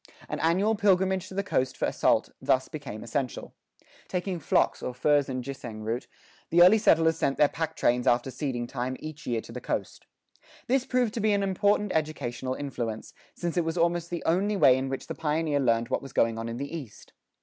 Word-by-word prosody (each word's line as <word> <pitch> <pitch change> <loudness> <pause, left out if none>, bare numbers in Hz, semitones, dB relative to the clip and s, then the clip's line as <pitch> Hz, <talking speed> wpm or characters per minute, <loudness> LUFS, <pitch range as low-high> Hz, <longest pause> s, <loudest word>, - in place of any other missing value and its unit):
An - - -4
annual 185 +7 +2
pilgrimage 190 -2 +2
to 190 - -10
the 200 - 0
coast 130 -9 -1
for - - 0
salt - - +2
thus 130 0 +2
became 140 -8 -7
essential. 125 +2 -3 0.5
Taking 180 -1 -2
flocks 145 - +1
or 125 - -4
furs 145 +1 +2
and 130 -1 -3
ginseng 120 -5 -7
root, 115 +4 -3 0.4
the 175 +1 +6
early 200 +5 +7
settlers 165 -5 +4
sent 135 - 0
their 150 - +6
pack 160 +1 -4
trains 125 -3 +1
after 120 +2 +2
seeding 125 -2 -3
time 125 +1 -4
each 155 -1 -8
year 115 -2 0
to - - -12
the - - -7
coast.[17:4] - - -7 0.2
This 260 +1 +1
proved 250 -4 +1
to 240 - -3
be 215 -1 +2
an 200 0 +1
important 205 +1 +1
educational 135 -5 -2
influence, 120 -6 -5 0.2
since 175 0 -3
it 175 - +3
was 165 +2 -3
almost 170 0 +1
the 170 -1 -4
only 195 +5 +1
way 130 -8 +6
in 130 +1 -2
which 135 - -4
the - - -5
pioneer 155 -1 0
learned 115 -3 +1
what - - 0
was 135 -3 -10
going 115 -1 +2
on 115 0 -4
in 115 - -5
the 140 +5 -5
East. 135 -10 -10
150 Hz, 205 wpm, -27 LUFS, 125-180 Hz, 0.5 s, early